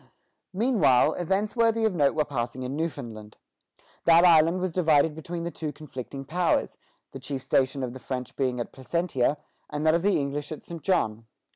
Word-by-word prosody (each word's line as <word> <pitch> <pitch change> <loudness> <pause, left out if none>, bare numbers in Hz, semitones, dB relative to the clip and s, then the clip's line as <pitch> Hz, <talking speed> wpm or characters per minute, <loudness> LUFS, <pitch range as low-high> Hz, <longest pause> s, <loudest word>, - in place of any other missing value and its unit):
Meanwhile 165 - +3
events 195 +5 -1
worthy 230 -1 +2
of 220 - +1
note 145 -4 +2
were 155 -1 +1
passing 130 -2 -4
in 130 +2 -4
Newfoundland. 120 -10 -5 0.7
That 170 +1 +6
island 165 +1 +5
was 185 -1 -1
divided 160 -3 +3
between 170 +2 -6
the 170 - -3
two 155 -3 -4
conflicting 135 -3 -8
powers, 175 +4 0 0.3
the 135 - -8
chief 130 0 -5
station 135 0 +1
of 125 -1 -4
the 130 - -9
French 125 -1 -5
being 130 -2 -1
at 120 - -4
Placentia, 140 0 -1 0.3
and 150 +1 -3
that 155 - +5
of 170 - +2
the 200 -1 +2
English 145 +1 -3
at 155 - -7
St. 170 -2 -8
John. 115 - 0
150 Hz, 180 wpm, -26 LUFS, 130-170 Hz, 0.7 s, That